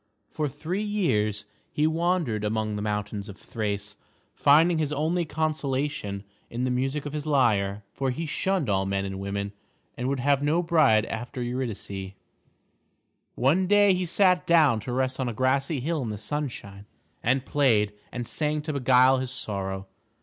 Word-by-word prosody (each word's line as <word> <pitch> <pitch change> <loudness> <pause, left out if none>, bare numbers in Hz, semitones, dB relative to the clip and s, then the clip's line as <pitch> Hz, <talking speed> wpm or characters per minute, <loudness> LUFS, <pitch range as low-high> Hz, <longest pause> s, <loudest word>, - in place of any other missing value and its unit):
For 150 -2 -1
three 160 +8 -3
years 125 - 0 0.3
he 150 - +1
wandered 160 - 0
among 110 0 -1
the 105 - -3
mountains 105 0 -3
of 100 - -9
Thrace, 105 -2 -4 0.4
finding 160 +4 +4
his 150 -2 0
only 160 +4 0
consolation 145 -9 -2 0.3
in 120 +2 -3
the 130 - 0
music 135 +4 -1
of 145 - -5
his 150 0 -4
lyre, 105 -8 +2
for 135 -1 -1
he 155 +6 -3
shunned 185 0 0
all 95 -1 +1
men 100 0 -1
and 95 0 -5
women 100 +1 -3 0.4
and 125 +2 -2
would 140 -1 -1
have 140 +2 +2
no 155 +4 +2
bride 150 - +4
after 120 +2 -5
Eurydice. 105 -6 -4 1.2
One 160 +9 +2
day 205 0 +5
he 180 -1 -1
sat 180 0 +3
down 155 -9 +5
to 115 +4 -6
rest 130 +1 -1
on 130 -2 0
a - - -4
grassy 135 +5 +1
hill 160 +2 -1
in 120 - -3
the 105 - -4
sunshine, 105 -5 -5 0.3
and 130 +2 +1
played 110 -8 +2 0.2
and 120 -2 -5
sang 150 -1 -1
to 155 0 -3
beguile 130 -1 +5
his 130 -1 -3
sorrow. 95 -6 -4
130 Hz, 165 wpm, -26 LUFS, 105-150 Hz, 1.2 s, day